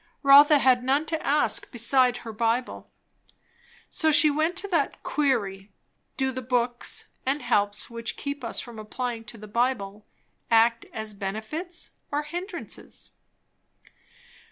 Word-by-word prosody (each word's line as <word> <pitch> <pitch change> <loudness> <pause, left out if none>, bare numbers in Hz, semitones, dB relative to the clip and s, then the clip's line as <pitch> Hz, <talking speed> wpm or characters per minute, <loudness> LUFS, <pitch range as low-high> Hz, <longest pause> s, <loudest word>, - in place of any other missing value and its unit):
Rotha 285 +2 +8
had 255 -3 +3
none 275 +4 +2
to 320 0 -2
ask 295 +2 +1
beside 245 +1 +3
her 225 - -6
Bible, 230 +3 -1 1.0
so 315 -3 +2
she 300 0 +6
went 315 +4 0
to 370 +3 -1
that 325 -7 0
Query, 205 -9 -1 0.5
do 265 -1 0
the 260 0 -5
books 245 0 -1 0.2
and 275 +3 -1
helps 205 0 +1
which 230 -1 -5
keep 280 -1 -5
us 230 - -2
from 235 -3 -8
applying 230 +2 -4
to 225 +1 -9
the 215 - -10
Bible, 210 -3 -1 0.4
act 230 0 +3
as 220 -1 -4
benefits 220 - -5 0.2
or 295 +1 0
hindrances? 350 +6 -6
250 Hz, 130 wpm, -26 LUFS, 225-290 Hz, 1.0 s, Rotha